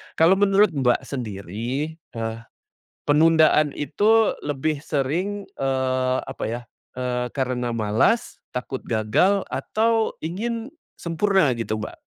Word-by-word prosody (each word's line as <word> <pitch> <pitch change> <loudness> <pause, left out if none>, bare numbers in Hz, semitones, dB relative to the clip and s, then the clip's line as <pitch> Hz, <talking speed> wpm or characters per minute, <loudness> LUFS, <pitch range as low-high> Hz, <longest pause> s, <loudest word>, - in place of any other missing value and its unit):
Kalau 180 +4 +5
menurut 200 -1 +4
Mbak 130 -5 +1
sendiri, 120 - -4
eee, 115 -5 -5 0.7
penundaan 155 -1 +5
itu 215 +9 +2
lebih 145 +1 -2
sering, 175 +9 -2
eee, 130 -1 0
apa - - -5
ya, 120 +2 -3 0.3
eee, 125 -1 -3
karena 125 -3 -1
malas, 110 - +1 0.2
takut 125 +1 -5
gagal, 120 - +2
atau 225 0 0
ingin 225 - -3 0.3
sempurna 170 -4 +2
gitu 110 -2 -2
Mbak? 105 - -8
145 Hz, 110 wpm, -23 LUFS, 125-190 Hz, 0.7 s, Kalau